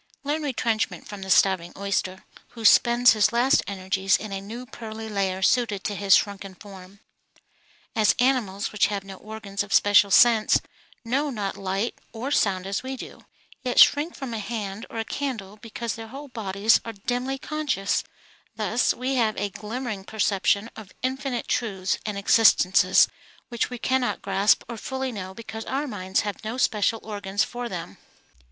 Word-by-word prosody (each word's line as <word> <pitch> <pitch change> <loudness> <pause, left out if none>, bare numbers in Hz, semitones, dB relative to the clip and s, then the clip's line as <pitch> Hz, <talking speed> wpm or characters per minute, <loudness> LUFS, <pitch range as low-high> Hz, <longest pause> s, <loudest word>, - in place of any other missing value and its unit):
Learn 295 +2 -1
retrenchment 235 -6 -1
from 205 -1 -8
the 190 - -7
starving 185 -2 +3
oyster, 195 -1 -2 0.3
who 225 - -6
spends 240 +3 +6
his 215 -2 +3
last 245 +3 +3
energies 190 0 +1
in 215 - -8
a 195 0 -4
new 230 +5 -8
pearly 225 -3 -8
layer 190 -3 -1
suited 215 -3 +2
to 210 - -2
his 200 -1 +5
shrunken 195 -2 -2
form. 195 0 -13 0.9
As 215 -1 +4
animals 240 -6 0
which 210 - +2
have 200 -1 -3
no 195 -1 -10
organs 210 -1 -6
of 205 0 -6
special 205 0 +5
sense 225 +1 +5 0.5
know 275 +6 0
not 205 -6 -3
light 195 +4 -3
or 245 +5 -4
sound 190 -8 +1
as 195 +1 -2
we 260 0 -5
do, - - -11 0.3
yet 250 -1 0
shrink 300 +4 +5
from 265 -4 -6
a 225 - -3
hand 210 -1 -5
or 225 -1 -3
candle 220 -7 -5
because 230 +1 -5
their 225 0 -8
whole 275 +5 -9
bodies 210 -2 +2
are 230 - -6
dimly 245 +6 -3
conscious, 285 -10 -1 0.5
thus 220 +3 +1
we 260 +2 -2
have 220 -3 +1
a 205 0 -2
glimmering 215 0 -5
perception 205 +1 0
of 210 -4 -12
infinite 260 -1 -2
truths 195 -5 -1
and 210 -2 -3
existences 190 -3 +5 0.4
which 235 -2 -1
we 250 - -6
cannot 260 +1 -1
grasp 195 +2 +3
or 235 -1 -6
fully 265 +3 -4
know 190 -4 -7
because 225 0 -7
our 275 +3 -2
minds 190 -7 -1
have 205 +1 -5
no 220 +3 -4
special 225 -2 +1
organs 205 -2 -2
for 245 0 -5
them. 165 - -7
215 Hz, 165 wpm, -25 LUFS, 195-245 Hz, 0.9 s, spends